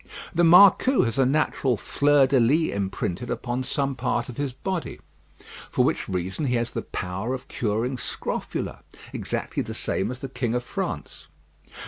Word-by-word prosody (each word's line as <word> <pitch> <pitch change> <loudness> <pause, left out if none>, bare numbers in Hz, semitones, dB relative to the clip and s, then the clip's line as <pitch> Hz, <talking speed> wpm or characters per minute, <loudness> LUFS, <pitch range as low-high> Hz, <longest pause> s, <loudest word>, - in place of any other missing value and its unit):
The 175 0 +2
marcou 200 +9 +7
has 115 +3 -1
a 130 - +5
natural 135 -3 +1
fleur 145 +6 +3
de 135 0 +3
lys 145 +8 +3
imprinted 100 +2 -3
upon 125 0 -2
some 135 +1 -1
part 120 -1 -1
of 120 - -8
his 140 -2 -1
body; 180 +7 -4 0.7
for - - +2
which - - -1
reason 95 - -2
he 125 -2 +1
has 120 0 -1
the - - -3
power 95 +7 -3
of 130 - -9
curing 120 +4 -1
scrofula, - - -4 0.3
exactly - - -3
the - - -5
same 95 - -1
as 125 - -5
the 135 - -6
King 120 -2 -2
of 125 - -1
France. - - -5
125 Hz, 165 wpm, -25 LUFS, 115-140 Hz, 0.7 s, marcou